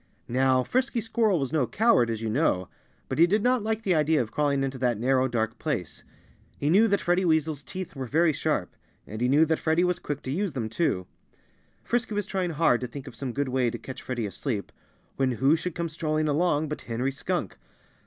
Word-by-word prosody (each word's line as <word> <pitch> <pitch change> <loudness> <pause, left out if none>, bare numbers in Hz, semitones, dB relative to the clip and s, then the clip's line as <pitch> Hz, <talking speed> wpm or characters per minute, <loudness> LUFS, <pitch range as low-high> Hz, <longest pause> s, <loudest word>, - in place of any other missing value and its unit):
Now, 130 +1 +2
Frisky 255 - 0
Squirrel 220 -4 +1
was 135 +1 -3
no 145 -6 +2
coward, 220 - +3
as 115 -1 -3
you 110 - -1
know. 105 - +1 0.4
But - - -3
he 170 - +7
did 205 +3 +1
not 250 -1 +3
like 220 +1 -2
the 190 - +2
idea 155 -1 +3
of 115 -3 -2
crawling 140 -2 +1
into 135 -1 -3
that 120 -3 +1
narrow, 130 +2 +2
dark 115 -2 -2
place. 135 - -3 0.5
He 145 +2 0
knew 215 +6 +6
that 200 -2 +1
Freddie 180 +2 +2
Weasel's 160 -3 +1
teeth 185 +3 -7
were 130 -2 -4
very 160 +5 +3
sharp. 145 - -1 0.3
And 110 +2 -7
he 125 - +2
knew 150 +4 +5
that 160 0 0
Freddie 160 +2 +2
was 180 0 +1
quick 145 -1 -5
to 130 - -4
use 185 +2 -1
them, 115 -5 -3
too. 110 - 0 0.8
Frisky 230 -3 -1
was 205 -1 -1
trying 190 -2 -2
hard 155 -7 +2
to 125 - -3
think 135 +2 -8
of 130 - -10
some 130 +2 -4
good 140 +2 -2
way 125 -1 +1
to - - -5
catch 130 - -9
Freddie 120 -3 -3
asleep, 105 +1 -4 0.5
when 130 -2 +1
who 135 +7 +3
should 175 0 -4
come 170 0 -2
strolling 155 -1 -1
along 155 0 +1
but 150 - -5
Henry 125 +4 -1
Skunk! 145 - -3
150 Hz, 220 wpm, -27 LUFS, 125-175 Hz, 0.8 s, he